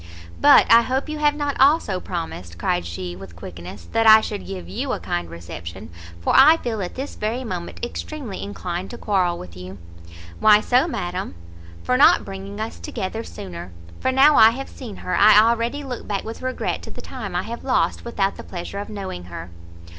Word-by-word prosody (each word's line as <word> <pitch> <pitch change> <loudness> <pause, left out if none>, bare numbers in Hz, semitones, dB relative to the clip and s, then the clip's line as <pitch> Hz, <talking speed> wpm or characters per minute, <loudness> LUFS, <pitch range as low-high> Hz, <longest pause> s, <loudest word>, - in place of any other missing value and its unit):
"But - - +8
I 230 +1 +9
hope 260 +5 -2
you 305 0 -4
have 295 -1 +3
not 290 -1 -2
also 270 - +4
promised," 160 - -6
cried 85 0 -1
she, 90 +1 -6
with 90 -2 -11
quickness, 85 +3 -10
"that 225 0 +2
I 220 0 +10
should 95 - -5
give 90 -3 -7
you 90 - -3
a - - -3
kind 85 -1 -3
reception, 85 0 -9 0.3
for 85 - 0
I 310 +5 +8
feel 225 -8 -3
at 180 - -5
this 270 +2 -5
very 225 +5 -3
moment 185 0 -5
extremely 245 -4 -6
inclined 185 -2 -5
to 240 - -8
quarrel 185 -6 0
with 85 -1 -10
you." 90 +2 -9 0.6
"Why 210 -1 +7
so, 250 +7 +2
madam?" 180 - -4 0.5
"For 250 - +1
not 320 +6 +6
bringing 195 +1 -7
us 220 +1 -5
together 220 +1 -4
sooner; 90 - -8 0.3
for 260 - +1
now 275 +3 +6
I 220 - +9
have 265 +4 -5
seen 235 -7 -9
her, 180 - 0
I 210 0 +7
already 235 +5 +1
look 250 -3 -6
back 200 -2 -2
with 225 +1 -7
regret 255 0 -2
to - - -10
the - - -9
time 215 -9 -7
I 180 - 0
have 235 +1 -7
lost 255 -1 +1
without 200 -5 -1
the - - -8
pleasure 180 +2 -6
of 205 - -6
knowing 190 - -6
her." 85 0 -8
205 Hz, 200 wpm, -22 LUFS, -, 0.6 s, I